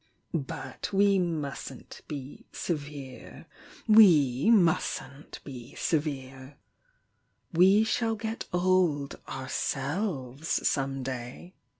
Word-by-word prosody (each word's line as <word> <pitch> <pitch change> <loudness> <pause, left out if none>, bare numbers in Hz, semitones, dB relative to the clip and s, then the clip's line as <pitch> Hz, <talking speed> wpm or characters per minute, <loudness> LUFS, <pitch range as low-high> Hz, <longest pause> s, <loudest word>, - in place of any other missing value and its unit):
But 135 -4 -4
we 200 0 +4
mustn't 160 -6 -4
be 140 -2 -8
severe— 145 -4 -6 0.4
we 165 - +6
mustn't 160 -8 +1
be 130 -2 -10
severe! 135 -3 -3 1.0
We 190 +5 +6
shall 225 0 0
get 220 +1 -4
old 180 -6 +1
ourselves 135 - -2
some 135 -1 -1
day!" 130 +7 -6
150 Hz, 80 wpm, -28 LUFS, 135-185 Hz, 1.0 s, we